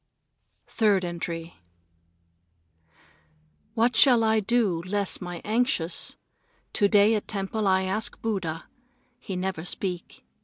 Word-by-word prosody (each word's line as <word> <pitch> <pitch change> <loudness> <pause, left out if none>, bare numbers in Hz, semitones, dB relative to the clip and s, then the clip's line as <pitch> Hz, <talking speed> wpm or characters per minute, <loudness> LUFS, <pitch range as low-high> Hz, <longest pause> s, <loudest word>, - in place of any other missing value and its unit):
Third 205 -5 +2
Entry 170 -1 -5 2.2
What 235 +2 +2
shall 245 -5 +6
I 220 0 +3
do 210 -5 +1
to 180 - -11
less 200 -1 -1
my 175 -1 -6
anxious? 215 -6 0 0.6
To 205 - +3
day 205 +2 +5
at 210 - -2
temple 205 +1 -2
I 190 0 +3
ask 195 +4 -2
Buddha. 185 -8 -3 0.5
He 195 - -6
never 180 -3 -3
speak. 180 0 -5
195 Hz, 115 wpm, -26 LUFS, 180-220 Hz, 2.2 s, shall